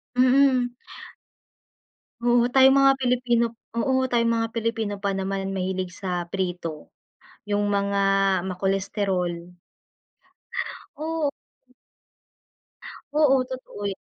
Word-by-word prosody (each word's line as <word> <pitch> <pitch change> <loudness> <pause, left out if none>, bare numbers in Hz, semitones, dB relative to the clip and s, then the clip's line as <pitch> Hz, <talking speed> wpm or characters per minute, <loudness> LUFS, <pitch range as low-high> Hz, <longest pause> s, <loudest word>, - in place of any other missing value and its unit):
Mm. 255 -1 +4 1.5
Oo, 240 0 +4
tayong 265 0 +7
mga 275 0 +6
Pilipino, 240 -2 +1 0.2
oo, 260 +3 +1
tayong 235 -2 +1
mga 230 0 +1
Pilipino 225 -2 -2
pa 200 - 0
naman 195 0 -2
mahilig 185 0 -2
sa 180 -1 -3
prito, 175 -5 -4 0.5
yung 205 -1 0
mga 200 0 0 0.5
ma-cholesterol. 185 -2 -2 1.4
Oh. 310 -2 -1 1.8
Oo, 270 -4 +4
totoo 260 -5 -8
yun. 195 - -7
225 Hz, 90 wpm, -24 LUFS, 190-255 Hz, 1.8 s, tayong